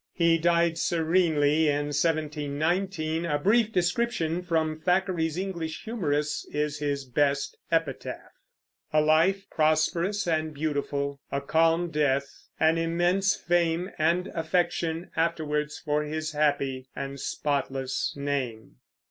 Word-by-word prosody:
He 170 -1 +3
died 170 0 +2
serenely 160 -3 +2
in 145 0 0
1719. 155 +3 -1
A 150 -3 0
brief 215 +8 +3
description 180 -3 0
from 160 -3 -1
Thackeray's 180 -2 0
English 170 -4 -4
Humorists 150 -10 -1
is 150 0 -2
his 140 -2 -2
best 140 +2 0 0.2
epitaph: 165 0 -2 0.6
A 155 - +4
life 165 +6 +3
prosperous 170 +6 +1
and 155 -2 0
beautiful, 140 -1 -2
a 140 - 0
calm 165 +4 +2
death; 140 -2 -1
an 160 +1 +3
immense 175 +4 +2
fame 175 +1 0
and 170 +4 +2
affection 170 0 -1
afterwards 150 -2 -1
for 150 0 -1
his 155 +1 -3
happy 140 -3 0
and 140 0 -5
spotless 135 -2 -2
name. 130 - -3
160 Hz, 115 wpm, -27 LUFS, 145-170 Hz, 0.6 s, A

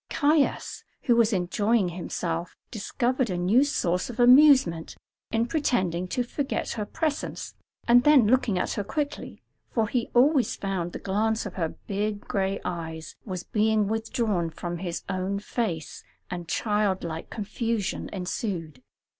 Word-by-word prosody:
Caius, 295 -1 +1 0.2
who 240 - +4
was 230 -1 +4
enjoying 200 +2 +1
himself, 170 -1 -4
discovered 245 +3 -1
a 180 - -1
new 195 +9 +4
source 180 -11 0
of 240 0 -8
amusement 250 - +6 0.3
in 225 +1 +1
pretending 185 - 0
to 245 +7 -1
forget 275 +3 -3
her 210 -3 -3
presence 310 +1 -3 0.3
and 245 +1 +6
then 295 -5 +6
looking 225 -3 +2
at - - -1
her 205 - -2
quickly, 290 +7 -4 0.3
for 225 -3 0
he 235 +1 -1
always 265 +1 +4
found 190 -3 -3
the - - -4
glance 220 +3 0
of 200 - -5
her 165 -4 -3
big 205 +1 -2
gray 195 -1 -1
eyes 160 -2 -5
was 185 -4 -4
being 215 -1 +2
withdrawn 220 -5 -1
from 175 +1 -5
his 175 -2 -4
own 190 +1 -2
face, 200 -6 -3 0.3
and 175 -2 -5
child 210 -3 0
like 165 -1 -5
confusion 220 0 -2
ensued. 180 - -4
210 Hz, 145 wpm, -26 LUFS, 180-240 Hz, 0.3 s, amusement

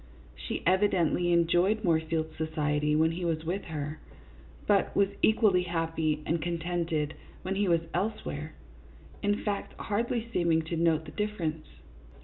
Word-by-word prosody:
She - - -5
evidently 180 -2 +3
enjoyed 175 +5 +3
Moorfield's 160 -2 0
society 150 -1 0
when 160 +1 +3
he 175 +2 -4
was 160 -2 -1
with 185 +5 -2
her, 155 -1 -5 0.7
but 200 -2 +2
was 200 -1 +4
equally 215 -4 +4
happy 165 -3 -1
and 165 0 0
contented 165 -2 -1 0.3
when 185 - -1
he 200 +1 +1
was 170 -2 +3
elsewhere, 175 -6 -3 0.7
in 205 +1 0
fact, 205 -2 -3
hardly 230 +2 -1
seeming 165 -2 +2
to 165 +2 -4
note 160 -1 +2
the - - -9
difference. 175 -7 -3
170 Hz, 135 wpm, -29 LUFS, 160-190 Hz, 0.7 s, was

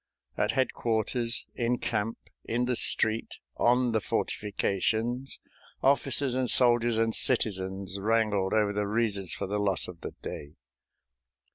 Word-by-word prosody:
At 105 +2 0
headquarters, 120 -2 -1
in 120 +1 0
camp, 115 0 -2 0.3
in 120 +2 -1
the 125 0 0
street, 110 0 +1 0.2
on 125 0 +3
the 110 -1 +1
fortifications, 110 +6 -2 0.4
officers 135 -1 +3
and 130 -1 0
soldiers 120 -2 +4
and 115 0 +1
citizens 95 -5 0
wrangled 105 -2 +1
over 105 -2 +2
the 105 0 -1
reasons 100 -5 -1
for - - -4
the 105 +2 -2
loss 100 -2 +1
of 85 -2 -10
the - - -7
day. 75 +1 -7
110 Hz, 130 wpm, -28 LUFS, 100-120 Hz, 0.4 s, soldiers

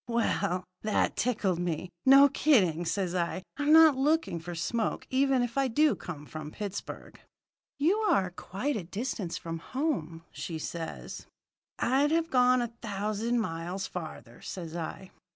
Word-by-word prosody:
"Well, 200 -6 0 0.2
that 215 -1 +1
tickled 205 -7 0
me. 175 0 -3 0.2
'No 275 +1 +9
kidding,' 190 - +3
says 185 0 -1
I. 180 +1 -1
'I'm 290 +1 +1
not 320 -2 +8
looking 290 - +1
for 175 +1 -7
smoke, 215 +7 -2
even 265 -1 +3
if 245 +3 -2
I 270 - +3
do 300 +5 +3
come 150 -5 -8
from 155 0 -7
Pittsburgh.' 200 +3 -7 0.6
"'You 330 +8 +3
are 195 - +2
quite 205 +10 -3
a 205 - -3
distance 195 -1 -4
from 165 0 -5
home,' 170 - -3
says 165 0 -6
she. - - -9
"'I'd 270 +4 +3
have 330 +1 +1
gone 250 -1 +4
a 235 -1 -5
thousand 215 +3 -1
miles 175 +1 -4
farther,' 155 -8 -8
says 170 -3 -6
I. 175 +3 -6
205 Hz, 150 wpm, -29 LUFS, 170-265 Hz, 0.6 s, No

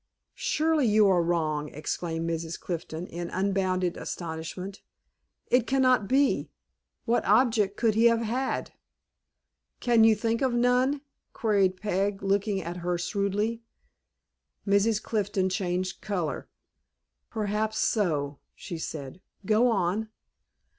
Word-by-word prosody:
"Surely, 320 -7 +1
you 215 0 +5
are 185 -3 +4
wrong!" 155 -3 0
exclaimed 165 +2 -3
Mrs. 165 0 -3
Clifton, 170 -1 -5
in 170 -1 -6
unbounded 185 -2 0
astonishment. 175 +4 -6 0.7
"It 245 -1 +3
cannot 255 -5 +3
be. 275 +3 +2 0.6
What 235 +1 +2
object 215 -2 +3
could 230 -2 +2
he 225 +2 +3
have 230 -1 +5
had?" 250 +4 -2 1.1
"Can 235 -2 +4
you 220 -1 +6
think 230 +2 -1
of 260 -3 +1
none?" 250 +3 +2 0.3
queried 195 -4 +2
Peg, 200 0 -1
looking 200 +1 +1
at 170 +2 -5
her 175 0 -1
shrewdly. 200 +5 -1 1.0
Mrs. 200 +2 +3
Clifton 200 -3 0
changed 185 -1 -2
color. 180 -7 -3 0.8
"Perhaps 215 0 -1
so," 150 -12 0 0.2
she 170 -4 -7
said. 150 +1 -6 0.2
"Go 220 +5 +4
on." 210 +1 0
200 Hz, 115 wpm, -27 LUFS, 175-230 Hz, 1.1 s, you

